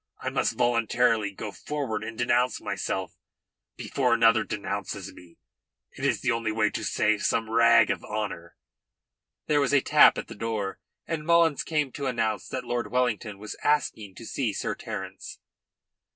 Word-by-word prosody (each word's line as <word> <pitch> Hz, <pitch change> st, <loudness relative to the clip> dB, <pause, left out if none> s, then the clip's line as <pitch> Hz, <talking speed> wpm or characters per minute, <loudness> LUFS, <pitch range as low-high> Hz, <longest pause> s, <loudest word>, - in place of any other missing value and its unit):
I -, -, -3 dB
must -, -, 0 dB
voluntarily 115 Hz, -2 st, +2 dB
go 100 Hz, +2 st, -7 dB
forward 130 Hz, -5 st, -4 dB
and 110 Hz, +1 st, -7 dB
denounce 125 Hz, +1 st, +1 dB
myself 95 Hz, -1 st, -3 dB, 0.6 s
before 125 Hz, -3 st, +1 dB
another 115 Hz, -1 st, +4 dB
denounces 105 Hz, -1 st, -5 dB
me. 85 Hz, -2 st, -16 dB, 0.5 s
It -, -, -10 dB
is -, -, +1 dB
the 125 Hz, -, +1 dB
only 115 Hz, -1 st, -1 dB
way 110 Hz, -1 st, +1 dB
to -, -, -4 dB
save 105 Hz, -1 st, +1 dB
some 115 Hz, -1 st, 0 dB
rag 115 Hz, +1 st, +5 dB
of -, -, -3 dB
honour." 95 Hz, -6 st, -5 dB, 0.9 s
There 145 Hz, -1 st, +2 dB
was 140 Hz, 0 st, +1 dB
a 140 Hz, -, +5 dB
tap -, -, +6 dB
at -, -, -5 dB
the -, -, -8 dB
door, 105 Hz, -3 st, -3 dB, 0.3 s
and 165 Hz, -2 st, -3 dB
Mullins 165 Hz, -2 st, +3 dB
came 150 Hz, -4 st, -1 dB
to 140 Hz, +1 st, -4 dB
announce 115 Hz, -3 st, -1 dB
that 130 Hz, -, -4 dB
Lord 120 Hz, 0 st, -3 dB
Wellington 120 Hz, -4 st, 0 dB
was 105 Hz, +2 st, -7 dB
asking 110 Hz, -9 st, 0 dB
to 115 Hz, -, -10 dB
see 115 Hz, -2 st, -2 dB
Sir -, -, -2 dB
Terence. -, -, -7 dB
115 Hz, 165 wpm, -27 LUFS, 110-125 Hz, 0.9 s, tap